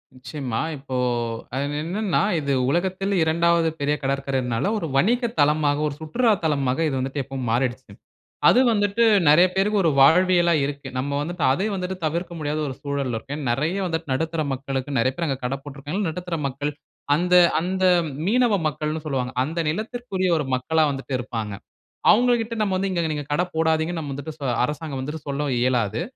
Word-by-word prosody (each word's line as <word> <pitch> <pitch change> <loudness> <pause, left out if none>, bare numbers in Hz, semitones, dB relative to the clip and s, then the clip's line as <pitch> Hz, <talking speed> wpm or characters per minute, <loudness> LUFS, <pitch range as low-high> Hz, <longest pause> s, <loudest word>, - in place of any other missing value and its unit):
நிச்சயமா. 130 -2 -4 0.2
இப்போ 135 -1 -7 0.6
அது 145 +2 -2
என்னென்னா, 190 +3 0 0.2
இது 140 -2 -1 0.2
உலகத்தில் 190 +5 0
2வது 170 +1 +2
பெரிய 145 +1 +1
கடற்கரைனால, 135 -3 -1
ஒரு 165 -6 -3
வணிக 240 - +2
தளமாக, 145 0 +3
ஒரு 140 - -4
சுற்றுலா 225 +9 +1
தளமாக 140 -2 0
இது 140 - -1
வந்துட்டு 135 +2 -2
எப்பவும் 130 -2 -5
மாறிடுச்சு. 125 -1 -1 0.6
அது 245 - +5
வந்துட்டு, 205 +1 +1 0.3
நெறைய 175 +5 +7
பேருக்கு 200 +1 +2
ஒரு 165 - +4
வாழ்வியலா 175 +3 +5
இருக்கு. 140 -1 -5
நம்ம 140 +2 -1
வந்துட்டு, 165 0 -3
அதையும் 200 +9 0
வந்துட்டு 185 0 -4
தவிர்க்க 170 +3 -2
முடியாத 150 0 -2
ஒரு 130 - -5
சூழல்ல 140 -4 -2
இருக்கோம். 135 +6 -5
ஏன்னா, 140 -5 -4
நெறைய 155 +10 0
வந்துட்டு 165 -4 -3
நடுத்தர 160 +3 -1
மக்களுக்கு 135 0 -3
நெறைய 130 +3 +2
பேரு 170 -1 -1
அங்க 135 - -1
கடை 135 +2 -1
போட்ருக்காங்க. 145 +6 -5
நடுத்தர 175 0 -4
மக்கள், 145 +3 -3 0.4
அந்த 180 +3 +2 0.3
அந்த 185 +1 -2 0.4
மீனவ 240 0 +3
மக்கள்னு 155 +1 -3
சொல்லுவாங்க. 130 -3 -2
அந்த 165 +3 -4
நிலத்திற்குரிய 210 -1 -2
ஒரு 150 - -2
மக்களா 155 +5 +1
வந்துட்டு 135 0 -6
இருப்பாங்க. 115 -4 -4 0.6
அவுங்ககிட்ட 235 -1 +2
நம்ம 195 -3 0
வந்து, 195 +1 -1
இங்க 170 -3 0
நீங்க 145 -2 -5
கடை 175 +4 +1
போடாதீங்க. 160 +1 +1
நம்ம 145 -3 -5
வந்துட்டு 140 -2 -4
அரசாங்கம் 150 -1 -4
வந்துட்டு 150 +3 -6
சொல்ல 140 +1 -2
இயலாது. 120 - +1
150 Hz, 165 wpm, -23 LUFS, 135-180 Hz, 0.6 s, நெறைய